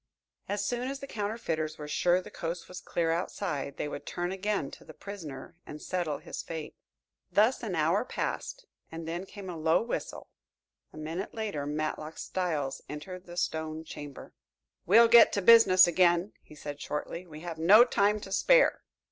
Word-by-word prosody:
As 205 0 -1
soon 245 +3 -2
as 275 0 -4
the 275 - -7
counterfeiters 205 - -3
were 150 - -7
sure 175 +4 +2
the - - -11
coast 170 +1 -5
was 180 - -8
clear 165 -1 -1
outside, 165 -4 -3
they - - -2
would 145 - -7
turn 175 +1 -3
again 195 -6 -2
to - - -12
the - - -13
prisoner 165 -8 -8
and 150 - -8
settle 170 -5 -2
his - - -7
fate. 160 -2 -7 0.6
Thus 220 +5 +3
an 210 -7 -3
hour 165 +7 +2
passed - - -4 0.3
and 165 0 -7
then 175 +3 -4
came 200 -1 -9
a 180 - -5
low 160 +4 +2
whistle. 235 - -5 0.6
A - - -14
minute 165 +6 -5
later 205 -11 -3
Matlock 155 +1 -3
Styles 155 -7 -2
entered 180 +5 -8
the 175 0 -10
stone 160 -2 -2
chamber. 145 -3 -9 0.5
"We'll 230 +6 +7
get 235 0 +8
to 200 - 0
business 195 -4 +8
again," 175 +2 +3
he 150 - -16
said 145 -1 -7
shortly. 170 +4 -5
"We 155 -1 -10
have 170 -2 -6
no 205 +9 +8
time 210 -3 +2
to 195 - -9
spare." - - +4
175 Hz, 175 wpm, -29 LUFS, 155-205 Hz, 0.6 s, get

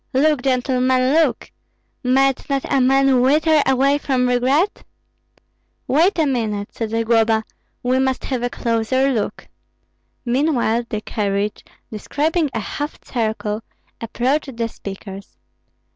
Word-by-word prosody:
Look, 295 +1 +2
gentlemen, 255 0 +1
look! 325 +1 +1 0.5
Might 270 +2 +2
not 275 -1 -1
a 270 - +3
man 270 0 +4
wither 305 +4 +4
away 275 +2 +3
from 255 -3 0
regret?" 265 +10 +1 1.0
"Wait 335 +9 +3
a 320 - +3
minute!" 220 -7 -2
said 225 -2 -4
Zagloba, 225 0 +2 0.4
"we 255 +1 +1
must 265 -1 0
have 255 -3 -2
a 245 - -1
closer 240 +4 0
look." 220 -5 -3 0.8
Meanwhile 240 -3 +1
the 215 - -3
carriage, 205 -1 -2 0.3
describing 300 - -1
a - - -3
half 290 +1 -5
circle, 220 -2 -2 0.4
approached 255 +3 -1
the 230 -1 -1
speakers. 195 -2 -9
255 Hz, 120 wpm, -20 LUFS, 230-275 Hz, 1.0 s, man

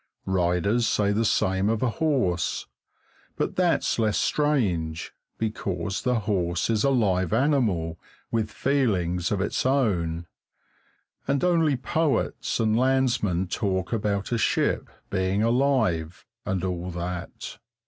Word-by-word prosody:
Riders 95 +5 +1
say 100 -1 +2
the 110 +3 +1
same 95 -1 +1
of 110 +1 0
a 125 - +2
horse, 125 - 0 0.7
but - - -2
that's - - +1
less 110 -2 +2
strange, 95 - 0 0.2
because 100 -4 -2
the 125 -3 +1
horse 90 -2 0
is 110 -2 +1
a 140 - +4
live 95 -9 +1
animal 110 - +1 0.3
with 110 -2 0
feelings 95 -11 0
of 100 -2 0
its 100 - -1
own, 90 -12 +1 1.0
and 140 +2 +1
only 165 -6 +3
poets 160 +3 -1
and 110 -1 +2
landsmen 120 -8 +2
talk 95 0 -2
about 100 -2 -1
a 120 - +1
ship - - +1 0.2
being 95 +2 +1
alive, 115 - +1 0.2
and 95 -3 -1
all 90 -1 -3
that. 90 0 -6
105 Hz, 125 wpm, -25 LUFS, 90-125 Hz, 1.0 s, a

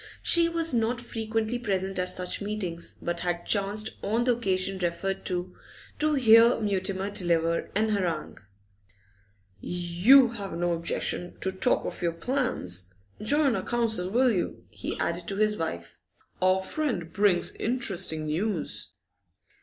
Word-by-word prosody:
She 335 -1 +4
was 330 -3 0
not 235 +1 0
frequently 225 0 -3
present 195 -4 -2
at 180 0 -1
such 180 +2 -2
meetings, 200 -5 -4
but 175 0 -2
had 175 0 -3
chanced, 210 +1 0
on 225 +4 0
the 245 -1 +2
occasion 190 -4 -1
referred 190 +2 -2
to, 180 0 -3 0.4
to 305 0 +2
hear 230 -2 +6
Mutimer 195 -1 -1
deliver 170 -3 0
an 220 +2 +2
harangue. 180 -7 -2 1.2
'You 180 - +4
have 205 -6 -6
no 175 0 0
objection 170 +1 -2
to 190 - +1
talk 190 - +1
of - - -5
your 170 -1 0
plans? 165 - 0 0.3
Join 280 +3 +2
our - - -1
council, 220 -6 0
will 250 +4 +3
you?' 180 -5 -3
he - - -5
added 170 +1 -2
to 195 - -3
his 215 +1 +2
wife. 85 - -5 0.4
'Our 185 +1 +3
friend 225 - -3
brings 200 -3 +3
interesting 195 -10 +1
news. 170 +4 -2
195 Hz, 140 wpm, -27 LUFS, 175-230 Hz, 1.2 s, hear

